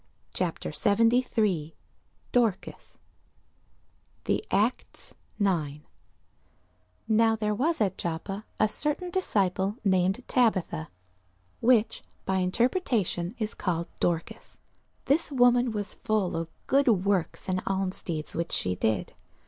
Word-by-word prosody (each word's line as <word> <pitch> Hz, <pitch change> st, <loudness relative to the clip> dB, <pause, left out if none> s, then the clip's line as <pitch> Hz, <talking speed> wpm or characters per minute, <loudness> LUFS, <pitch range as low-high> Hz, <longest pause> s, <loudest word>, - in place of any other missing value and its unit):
CHAPTER 180 Hz, -3 st, -2 dB
73 210 Hz, -2 st, +2 dB, 0.6 s
DORCAS 230 Hz, -6 st, +1 dB
[Sidenote: -, -, -25 dB, 1.3 s
The -, -, 0 dB
Acts 215 Hz, +5 st, -1 dB, 0.2 s
9] 155 Hz, -8 st, 0 dB, 1.2 s
NOW 225 Hz, 0 st, +4 dB
there 210 Hz, -1 st, -1 dB
was 310 Hz, +10 st, +1 dB
at 190 Hz, -3 st, 0 dB
Joppa 175 Hz, +5 st, -4 dB, 0.2 s
a 215 Hz, -, +4 dB
certain 300 Hz, -, 0 dB
disciple 200 Hz, -, 0 dB
named 190 Hz, +4 st, +2 dB
Tabitha, 190 Hz, -, +1 dB, 0.7 s
which 230 Hz, -2 st, +3 dB, 0.2 s
by 190 Hz, -, 0 dB
interpretation 205 Hz, -, 0 dB
is 215 Hz, -1 st, -3 dB
called 170 Hz, -2 st, -2 dB
Dorcas: 170 Hz, -2 st, -2 dB, 0.5 s
this 300 Hz, +3 st, +1 dB
woman 245 Hz, -2 st, +4 dB
was 205 Hz, -2 st, -4 dB
full 215 Hz, -4 st, -1 dB
of 165 Hz, 0 st, -3 dB, 0.2 s
good 275 Hz, +1 st, +3 dB
works 200 Hz, -5 st, +1 dB
and 185 Hz, 0 st, -1 dB
almsdeeds 185 Hz, -5 st, -2 dB
which 170 Hz, +1 st, -3 dB
she 90 Hz, -, 0 dB
did. 100 Hz, +1 st, -1 dB
200 Hz, 110 wpm, -27 LUFS, 180-235 Hz, 1.3 s, NOW